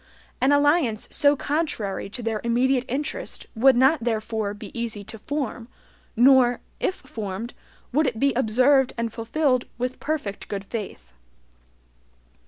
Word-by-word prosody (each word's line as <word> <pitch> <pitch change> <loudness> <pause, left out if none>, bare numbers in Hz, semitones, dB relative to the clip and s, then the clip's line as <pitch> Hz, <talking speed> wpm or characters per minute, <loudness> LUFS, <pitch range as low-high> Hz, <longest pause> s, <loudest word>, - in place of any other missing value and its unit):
An 265 - +4
alliance 285 -6 +2
so 285 0 +4
contrary 280 - -2
to 240 +4 -7
their 220 -1 -2
immediate 250 +2 +2
interest 295 - -4
would 260 +3 +5
not 265 +2 +4
therefore 220 -2 -2
be 210 0 -10
easy 230 -3 -4
to 220 +2 -10
form, 255 -3 -4 0.5
nor, 245 0 +5 0.2
if 375 - 0
formed, 225 -3 -6 0.4
would 305 +2 +3
it 225 -3 -2
be 275 +1 +3
observed 255 +3 +3
and 230 -1 -2
fulfilled 255 +2 0
with 250 +1 -3
perfect 285 -10 -3
good 200 -1 -5
faith. 190 - -7
245 Hz, 135 wpm, -24 LUFS, 220-275 Hz, 0.5 s, would